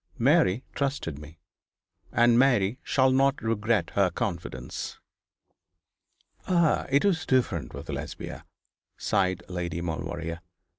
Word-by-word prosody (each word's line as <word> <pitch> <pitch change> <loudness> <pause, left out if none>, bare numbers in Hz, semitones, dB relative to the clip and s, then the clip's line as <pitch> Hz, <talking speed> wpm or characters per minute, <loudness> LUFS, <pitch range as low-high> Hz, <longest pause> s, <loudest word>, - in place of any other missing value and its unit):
Mary 130 - +3
trusted 135 - -2
me; 75 +2 -12 0.7
and 120 +1 +5
Mary 125 -3 +3
shall 130 -1 +3
not 135 +1 +3
regret 110 0 0
her 100 -2 +3
confidence.' 85 0 -4 1.5
'Ah! 170 -4 +2
it 140 +5 +3
was 175 -6 +2
different 125 - 0
with - - -8
Lesbia,' - - -6 0.5
sighed 95 -2 0
Lady 85 -2 -3
Maulevrier. 85 0 -4
115 Hz, 105 wpm, -27 LUFS, 90-135 Hz, 1.5 s, and